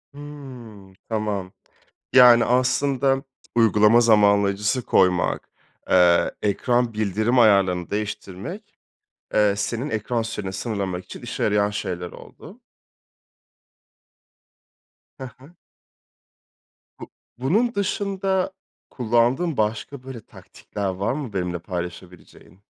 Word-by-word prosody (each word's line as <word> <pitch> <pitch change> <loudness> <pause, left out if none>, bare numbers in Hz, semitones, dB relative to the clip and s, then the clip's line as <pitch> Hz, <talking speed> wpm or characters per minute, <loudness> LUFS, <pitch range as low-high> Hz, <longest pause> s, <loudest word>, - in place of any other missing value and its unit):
Hıı, 130 -9 -11 0.2
tamam. 105 -4 -3 0.6
Yani, 120 -2 +7
aslında 135 +2 +1 0.3
uygulama 110 0 +5
zamanlayıcısı 105 +1 +3
koymak, 90 -5 +1 0.4
eee, 90 -1 +4
ekran 120 +4 0
bildirim 110 +4 0
ayarlarını 95 -6 +3
değiştirmek, 100 -2 -6 0.6
eee, 105 -1 +3
senin 120 +7 -3
ekran 115 +2 -2
süreni 105 -4 -5
sınırlamak 95 -3 -4
için - - -11
işe - - -5
yarayan 105 -1 +2
şeyler 90 -3 -5
oldu. - - -14 2.6
Hı 130 - -6
hı. 140 +6 -17 1.5
Bu - - -10 0.3
bunun 210 - +1
dışında 195 -1 -1 0.4
kullandığın 125 +7 +1
başka, 110 +5 -2
böyle, 130 -3 -9
taktikler 100 -1 -7
var 95 +5 -2
mı 135 -6 -6
benimle 90 -2 -2
paylaşabileceğin? 90 0 -9
110 Hz, 90 wpm, -23 LUFS, 100-130 Hz, 2.6 s, Yani